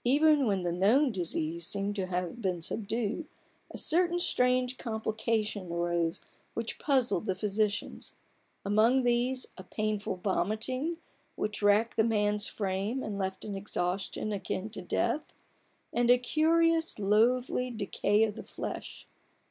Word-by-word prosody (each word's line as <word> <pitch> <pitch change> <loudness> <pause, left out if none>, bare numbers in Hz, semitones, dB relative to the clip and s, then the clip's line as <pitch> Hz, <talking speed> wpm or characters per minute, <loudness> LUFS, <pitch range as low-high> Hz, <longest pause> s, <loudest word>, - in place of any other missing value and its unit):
Even 290 +1 +4
when 195 -3 +1
the 175 - 0
known 225 - +4
disease 170 -3 -2
seemed 200 0 -2
to 190 -1 -1
have 180 +5 -3
been 185 -4 0
subdued; 220 - -2 0.5
certain 350 +1 +1
strange 250 -5 +1
complications 220 -4 -2
arose 170 0 0 0.3
which 230 -1 -3
puzzled 255 - +1
the 190 - +1
physicians: 210 +1 -2 0.5
amongst 225 +6 +4
these 245 +2 +1
a - - -7
painful 210 0 -2
vomiting 215 - -1 0.4
which 210 0 -2
racked 205 +3 +3
the 220 - +5
man's 210 -2 +1
frame 200 +5 -2
and 205 -2 -4
left 190 0 -3
an 205 -2 -4
exhaustion 195 +1 -2
akin 200 +1 -3
to - - -6
death, 305 - -1 0.6
and 240 0 +2
a 245 - +8
curious 325 +5 +2
loathlv 240 +4 +2
decay 205 +1 +2
of 215 -2 +1
the 225 - -7
flesh. - - -6
215 Hz, 130 wpm, -30 LUFS, 195-250 Hz, 0.6 s, a